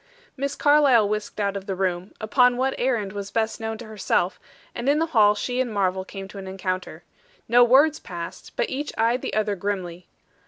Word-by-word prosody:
Miss 280 +1 -3
Carlyle 285 -7 +5
whisked 210 +1 -4
out 200 -1 0
of 200 0 -6
the 195 - -2
room; 185 0 -2
upon 245 +3 +3
what 265 +1 +1
errand 230 -6 0
was 200 -1 -5
best 220 -1 -1
known 220 0 -4
to 235 - -9
herself; 205 -3 -1 0.3
and 240 +3 -2
in 290 - +4
the 325 - +2
hall 210 -3 +5
she 250 +4 -1
and 245 -3 -2
Marvel 190 -2 0
came 195 0 -8
to 200 - -9
an 190 - -8
encounter. 185 -1 -4 0.4
No 240 +2 +6
words 275 +6 +5
passed, 170 -1 -8
but - - 0
each 290 +3 -3
eyed 235 +3 +2
the - - -4
other 210 -1 +1
grimly. 180 -3 -4
215 Hz, 200 wpm, -24 LUFS, 195-250 Hz, 0.4 s, No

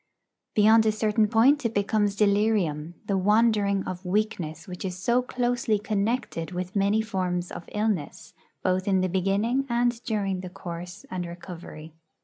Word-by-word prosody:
Beyond 220 +1 +6
a - - +5
certain 215 0 +2
point 245 +7 +4
it 230 -1 -1
becomes 205 0 +1
delirium, 200 -6 +1
the 195 -2 0
wandering 205 -1 +3
of 185 0 -6
weakness 180 -5 -2
which 180 -1 -7
is 185 -2 -4
so 235 +6 +2
closely 245 -3 0
connected 210 -4 -2
with 180 +3 -4
many 200 +2 +2
forms 180 -4 -2
of 170 - -8
illness, 185 -6 -2 0.3
both 185 +1 0
in 190 -2 +3
the 185 - +1
beginning 200 +9 +1
and 240 0 +1
during 200 -4 -1
the 185 0 -6
course 175 +2 -8
and 180 -2 -3
recovery. 170 -2 -9
200 Hz, 150 wpm, -26 LUFS, 180-220 Hz, 0.3 s, Beyond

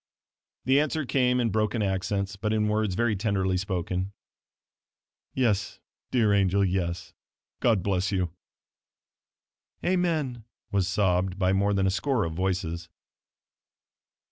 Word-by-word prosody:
The 135 +3 +4
answer 155 0 0
came 125 -1 +2
in 115 -3 +1
broken 110 +1 0
accents 95 0 -1
but 105 +2 -2
in 105 -1 +1
words 105 -3 0
very 120 0 +1
tenderly 95 -2 0
spoken 95 0 -2 1.2
"Yes, 110 -7 0 0.3
dear 110 -5 +3
angel, 100 0 +3
yes. 85 -2 -2 0.5
God 110 -7 +2
bless 95 0 0
you." 90 -4 0 1.5
"Amen!" 160 -10 0 0.3
was 95 -3 +1
sobbed 95 -1 +1
by 95 -1 +2
more 100 +1 +2
than 95 -1 +2
a 95 - +2
score 110 +5 0
of 80 - -3
voices. 90 -2 -2
100 Hz, 120 wpm, -27 LUFS, 95-110 Hz, 1.5 s, The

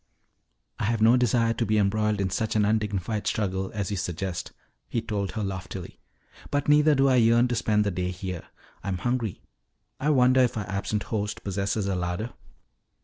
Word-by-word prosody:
"I - - 0
have 110 0 +1
no 115 +2 +7
desire 120 -2 +2
to 115 - -1
be 110 -1 +1
embroiled 105 +1 +1
in 95 -2 0
such 110 +4 -1
an 105 -1 +3
undignified 105 -1 -1
struggle 95 -2 -1
as 100 -1 -2
you 100 - -1
suggest," 90 -1 -3 0.4
he 115 - 0
told 105 -4 -3
her 110 - -2
loftily. 95 -2 -6 0.5
"But 145 0 -1
neither 150 +1 +5
do 135 0 +4
I 130 -1 +4
yearn 120 +1 +5
to 120 - 0
spend 105 -2 +2
the 100 - 0
day 90 0 -2
here. 90 -1 -5 0.4
I'm 95 -1 -2
hungry. 120 0 -2 0.6
I 145 - 0
wonder 130 -2 +5
if 125 -2 +1
our 105 -3 -3
absent 100 +2 -2
host 105 -1 -3
possesses 100 +1 -1
a 100 - 0
larder?" 90 +6 -3
105 Hz, 185 wpm, -26 LUFS, 95-115 Hz, 0.6 s, no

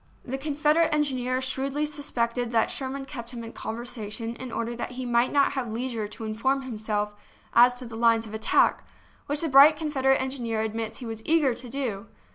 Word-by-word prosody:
The 265 +2 -4
Confederate 300 +3 +2
engineer 260 -4 0
shrewdly 270 +3 -1
suspected 245 -5 -2
that 225 -2 +2
Sherman 270 0 -4
kept 250 -4 -7
him 240 -2 -7
in 230 - -8
con 220 - -5
versation 230 -1 -5
in 255 -2 -7
order 230 +1 -3
that 240 - -5
he 255 0 -5
might 240 +1 +2
not 280 -1 +3
have 260 -5 -3
leisure 230 -2 -3
to 215 - -10
inform 265 +6 0
himself 215 -4 -2 0.4
as 245 +1 +6
to 250 0 -8
the 230 -1 -8
lines 230 0 +3
of 215 - -10
attack, 220 0 +2 0.4
which 290 +1 +1
the 330 - +1
bright 285 +2 +8
Confederate 270 -4 +2
engineer 245 -4 -2
admits 220 0 -3
he 250 - -7
was 225 -1 -5
eager 305 -5 +3
to 245 +1 -8
do! 230 -6 -3
250 Hz, 195 wpm, -26 LUFS, 230-275 Hz, 0.4 s, bright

